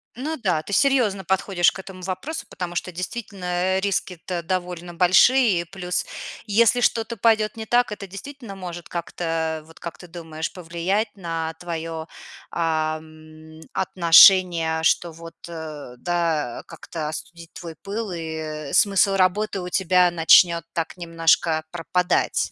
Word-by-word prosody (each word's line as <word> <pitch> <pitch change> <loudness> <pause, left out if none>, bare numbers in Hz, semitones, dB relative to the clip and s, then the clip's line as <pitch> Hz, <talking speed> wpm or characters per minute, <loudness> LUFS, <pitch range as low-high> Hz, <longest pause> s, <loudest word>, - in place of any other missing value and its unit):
Ну 300 +6 -4
да, 180 -9 0
ты 200 - -7
серьёзно 235 -7 +2
подходишь 190 -1 +2
к - - -10
этому 190 -1 -10
вопросу, 190 - -5
потому 175 -1 -6
что 185 - -3
действительно, 190 +2 -6
э, 180 +1 +1
риски-то 185 -3 -2
довольно 175 0 -4
большие. 190 +4 +5
И - - -5
плюс, 180 0 -3 0.4
если 230 +3 +4
что-то 230 0 +1
пойдёт 220 -1 +2
не 220 - -5
так, 240 0 +2
это 205 -1 -6
действительно 215 +3 -9
может 175 -2 -7
как-то, 165 -2 -3
вот 165 +1 -17
как 170 - -7
ты 180 - -11
думаешь, 160 -2 -6
повлиять 180 +5 -2
на 165 -4 -4
твоё, 165 -2 -5 0.4
ам, 155 -1 -4
отношение, 170 -2 +5
что 170 +1 +2
вот, 165 +1 -11
э, 155 -6 -8
да, 165 -6 -1
как-то 160 -3 -6
остудить 170 +1 -8
твой 165 -2 -8
пыл, 205 +1 -4
и 160 -3 -5
смысл 200 -1 +4
работы 195 +2 +1
у 180 - -5
тебя 180 -1 +3
начнёт 170 0 +5
так 165 +2 -3
немножко 165 -1 +2
пропадать. 180 +1 0
175 Hz, 140 wpm, -23 LUFS, 165-195 Hz, 0.4 s, большие